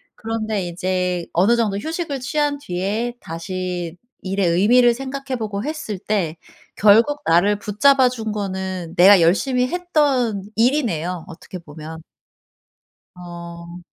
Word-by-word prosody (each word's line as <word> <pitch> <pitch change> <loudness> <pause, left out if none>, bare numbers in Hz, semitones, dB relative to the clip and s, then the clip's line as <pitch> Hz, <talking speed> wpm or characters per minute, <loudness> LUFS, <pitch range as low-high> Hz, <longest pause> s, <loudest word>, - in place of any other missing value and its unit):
그런데 220 -3 -3
이제 180 0 -2
어느 195 +8 +4
정도 210 -4 0
휴식을 315 - -4
취한 290 +2 0
뒤에 215 +2 -3
다시 175 +1 -5 0.3
일의 195 -1 -1
의미를 235 +7 +4
생각해보고 260 -6 -4
했을 300 - -4
때 180 -7 -2 0.4
결국 230 +9 +4
나를 200 +5 +3
붙잡아 255 +6 +4
준 220 -3 -4
거는 190 -4 -4
내가 190 +1 +8
열심히 250 +9 +2
했던 275 - 0
일이네요 195 - 0
어떻게 185 +1 -10
보면. 160 0 -10 1.1
어. 170 0 -9
205 Hz, 250 characters per minute, -21 LUFS, 180-250 Hz, 1.1 s, 내가